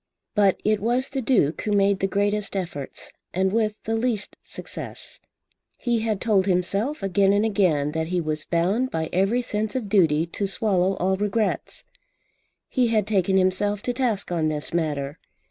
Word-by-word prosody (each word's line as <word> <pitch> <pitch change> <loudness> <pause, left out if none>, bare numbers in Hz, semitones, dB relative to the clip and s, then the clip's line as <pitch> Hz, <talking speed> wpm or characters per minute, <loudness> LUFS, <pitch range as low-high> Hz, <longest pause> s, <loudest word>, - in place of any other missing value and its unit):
But 200 -3 +3
it 215 0 +3
was 240 +5 0
the 270 -1 -2
Duke 215 - +2
who 210 - -1
made 200 -1 +3
the 195 - +1
greatest 205 +1 0
efforts, 165 -8 -5 0.2
and 190 +1 +1
with 215 -2 +1
the 225 - -1
least 225 -3 -1
success. - - -9 0.6
He 240 -2 0
had 220 -2 -1
told 200 -4 +2
himself 195 - 0
again 195 0 +3
and 205 +2 +2
again 175 -9 +2
that 160 0 -2
he 180 +1 0
was 155 -1 -2
bound 190 +10 +1
by 160 -5 -2
every 195 +7 +2
sense 215 -1 -2
of 235 -6 -2
duty 165 -6 +3
to 195 +4 -3
swallow 195 -1 +1
all 190 +1 0
regrets. 210 +2 -1 0.8
He 250 -3 +1
had 220 -3 +2
taken 195 -2 +2
himself 195 +2 +1
to 245 - -1
task 235 -8 -1
on 165 -3 +1
this 150 0 -3
matter. 150 -3 -2
200 Hz, 170 wpm, -24 LUFS, 180-220 Hz, 0.8 s, But